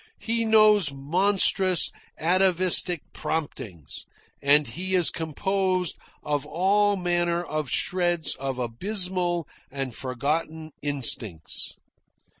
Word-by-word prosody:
He 230 0 -1
knows 215 -6 +4
monstrous, 185 +5 +4 0.3
atavistic 180 -1 +3
promptings, 110 - -6 0.3
and 145 +1 +4
he 185 +5 -3
is 175 -3 +3
composed 185 +2 -1 0.3
of 145 -1 -2
all 200 +6 +1
manner 175 -1 -1
of 155 -4 -4
shreds 175 -3 0
of 135 -1 -5
abysmal 175 - -2 0.2
and 135 -2 -5
forgotten 155 +6 -4
instincts." 115 - 0
170 Hz, 90 wpm, -24 LUFS, 145-185 Hz, 0.3 s, knows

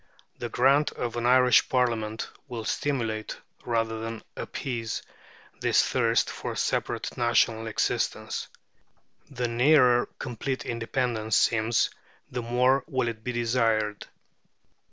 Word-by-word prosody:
The 120 - -4
grant 135 +5 +3
of 120 -1 -4
an 120 0 0
Irish 125 0 +5
Parliament 115 -4 0 0.2
will 115 -3 -6
stimulate 115 -7 -2 0.3
rather 115 -1 -1
than 115 0 -6
appease 115 -4 -4 0.6
this - - +3
thirst - - +2
for - - -5
separate - - -2
national 115 -1 +2
existence. 110 - -1 0.8
The 125 -3 -2
nearer 125 0 +4
complete 130 +1 -4
independence 115 -2 -1
seems, 115 0 +2 0.4
the 125 - -3
more 125 +3 +2
will 130 -6 0
it 110 -1 -8
be 125 - -2
desired. 115 -3 0
120 Hz, 115 wpm, -27 LUFS, 115-125 Hz, 0.8 s, Irish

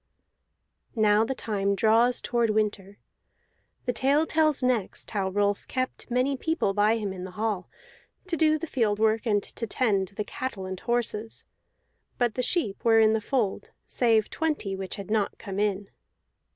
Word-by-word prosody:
Now 215 -1 +4
the 265 +4 -2
time 200 -4 -1
draws 230 +4 +3
toward 235 -2 0
winter. 205 -2 -1 0.9
The 245 - 0
tale 280 +6 +2
tells 310 -4 +1
next 245 -6 -1
how 195 -3 -1
Rolf 205 +1 0
kept 255 0 -3
many 255 +3 +1
people 320 -7 0
by 210 +2 +3
him 205 -3 -3
in 180 -1 -7
the 185 - -6
hall, 210 -4 -2 0.6
to 365 -2 -2
do 310 -1 +3
the 330 - -5
field 225 -9 0
work 220 +2 +1
and 205 -2 +2
to 230 - -6
tend 205 -5 +1
the 200 +3 -5
cattle 220 -4 -5
and 185 -1 -5
horses 230 -2 -2 0.7
(but 240 -3 +1
the 250 - -1
sheep 250 - 0
were 225 -1 +5
in 220 0 +5
the 220 - 0
fold, 230 -4 -1 0.2
save 225 -3 +2
twenty 300 -12 -2
which 190 -1 -5
had 200 0 -8
not 215 -2 0
come 195 -2 -6
in). 205 -1 0
220 Hz, 165 wpm, -27 LUFS, 205-250 Hz, 0.9 s, were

